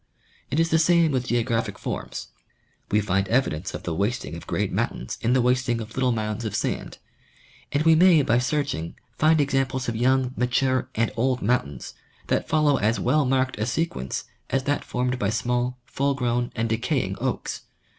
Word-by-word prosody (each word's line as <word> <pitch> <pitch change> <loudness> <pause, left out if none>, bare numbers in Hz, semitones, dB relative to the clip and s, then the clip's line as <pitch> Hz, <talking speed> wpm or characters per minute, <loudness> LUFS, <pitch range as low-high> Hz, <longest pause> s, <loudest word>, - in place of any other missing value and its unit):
It 150 - 0
is 165 0 +2
the 160 - +4
same 170 -1 +4
with 130 -2 -1
geographic 115 -3 0
forms. - - -5 0.6
We 105 - +3
find 95 0 0
evidence 100 - 0
of - - -7
the 85 - -2
wasting 100 +8 -2
of - - -10
great - - -1
mountains 60 - -2
in 115 +2 +2
the 130 -1 +3
wast 125 0 +1
ing 120 -1 +1
of 110 0 -7
little 130 -1 +1
mounds 110 0 -2
of 110 - -3
sand; - - -2 0.7
and 145 +2 +1
we 165 0 +6
may 165 -2 +6
by 120 -1 +3
searching 125 - -2 0.2
find 155 +1 +4
exam 135 -2 +2
ples 130 0 -4
of 115 - -1
young, 130 +2 +2
mature 130 +1 +1
and 115 0 +1
old 125 +2 0
mountains, 85 - -1 0.4
that - - 0
follow 150 -3 +3
as 110 +1 +1
well 150 -1 +2
marked 130 -3 0
a 110 - 0
sequence 125 - -2 0.3
as 135 0 0
that 145 +2 0
formed 125 0 -2
by 100 - +1
small, 125 +2 -1
full 140 0 0
grown 120 -2 -1
and 115 0 0
decaying 115 +1 0
oaks. - - -2
125 Hz, 185 wpm, -25 LUFS, 115-135 Hz, 0.7 s, we